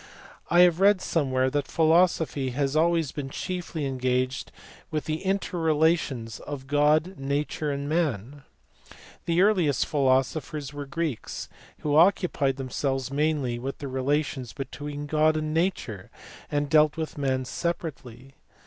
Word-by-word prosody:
I 175 +1 +6
have 175 -1 +5
read 200 0 +5
somewhere 130 -7 0
that 145 -1 -1
philosophy 160 -4 +2
has 140 0 0
always 165 -2 +2
been 140 -2 -5
chiefly 175 -1 -4
en 135 -1 -3
gaged 130 +1 -1 0.4
with 155 -1 -3
the 155 +2 -3
inter 195 -2 -1
relations 155 -8 +1
of 145 -3 -7
God, 150 +5 +2
Nature, 145 +2 -2
and 140 0 -3
Man. 145 - -1 0.8
The 170 +2 +3
earliest 180 -9 +3
philosophers 140 +1 0
were 145 -1 -6
Greeks 160 -5 -4 0.3
who 145 -1 0
occupied 165 -5 +3
themselves 135 0 -2
mainly 145 -4 0
with 135 +3 -5
the 140 - -6
relations 130 -1 -1
between 145 +1 -6
God 155 +1 +2
and 155 0 -2
Nature, 160 - -2 0.4
and 145 0 0
dealt 150 +1 +4
with 160 -2 -4
Man 130 -2 0
separately. 135 -4 -5
145 Hz, 135 wpm, -26 LUFS, 135-160 Hz, 0.8 s, I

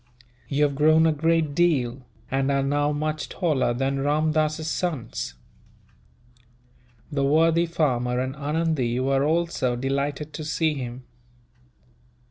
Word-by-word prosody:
You 145 +1 +1
have 145 -1 +2
grown 155 +3 +4
a 160 - +4
great 160 0 +1
deal, 135 -7 +1 0.2
and 135 +1 +1
are 140 -1 +1
now 145 +1 +1
much 155 +1 -3
taller 155 -8 0
than 135 +3 -1
Ramdass's 155 +2 0
sons." 155 - -3 1.8
The 140 -1 0
worthy 165 +4 +3
farmer 125 -7 0
and 130 +1 -2
Anundee 145 -4 -1
were 135 +1 +1
also 160 -5 0
delighted 140 +4 -2
to 155 - -5
see 160 0 0
him. 125 -2 -6
145 Hz, 120 wpm, -24 LUFS, 135-155 Hz, 1.8 s, grown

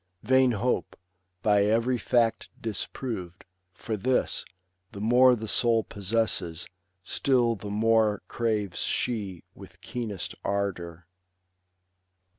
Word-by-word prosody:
Vain 130 +1 +4
hope, 120 +4 -1 0.5
by 105 -1 +4
every 115 +4 +2
fact 115 -2 +1
disproved; 105 -4 -5 0.3
for 110 +4 -4
this, 125 +5 0 0.5
The 100 - -7
more 125 +4 +5
the 110 -1 -6
soul 115 0 +3
possesses, 100 -6 -1 0.4
still 120 +3 +2
the 105 -1 -7
more 110 -1 +2
Craves 105 -6 -1
she 100 -8 -1
with - - -14
keenest 110 -6 -5
ardour. 90 -4 -3
110 Hz, 100 wpm, -27 LUFS, 100-120 Hz, 0.5 s, more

